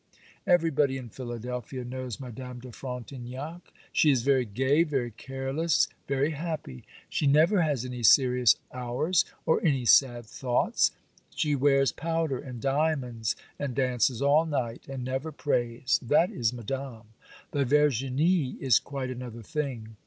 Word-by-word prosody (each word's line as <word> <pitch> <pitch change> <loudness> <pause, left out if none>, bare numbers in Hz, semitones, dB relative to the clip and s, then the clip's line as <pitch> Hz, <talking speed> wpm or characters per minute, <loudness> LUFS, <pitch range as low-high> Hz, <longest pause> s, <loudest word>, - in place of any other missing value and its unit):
Everybody 155 -6 +3
in 125 -3 -8
Philadelphia 125 +1 -6
knows 130 -2 -5
Madame 125 -1 -8
de 125 0 -10
Frontignac; 130 +6 -7 0.2
she 155 - +4
is 130 -5 +3
very 135 -2 +3
gay, 130 +8 +2
very 135 -7 -1
careless, 135 +7 -1 0.2
very 140 +3 +1
happy; 155 - -5 0.2
she 145 - 0
never 160 +7 +4
has 145 -6 0
any 125 -1 -5
serious 125 0 +5 0.2
hours, 125 +8 0 0.2
or 160 - +2
any 135 -7 +1
sad 120 0 +4
thoughts; 125 +2 +1 0.5
she 150 -1 +1
wears 135 0 +3
powder 165 -4 -2
and 125 -4 -8
diamonds, 135 -6 0 0.2
and 140 -4 -3
dances 125 -1 +1
all 150 +3 +4
night, 125 -6 -3
and 135 -2 -5
never 130 +5 -3
prays—that 135 +3 +1
is 120 -3 0
Madame. 125 -2 -6 0.4
But 140 -2 0
Verginie 145 +3 +2
is 130 -5 +4
quite 135 -2 -5
another 120 -2 -7
thing. 115 -5 -4
130 Hz, 135 wpm, -28 LUFS, 125-145 Hz, 0.5 s, serious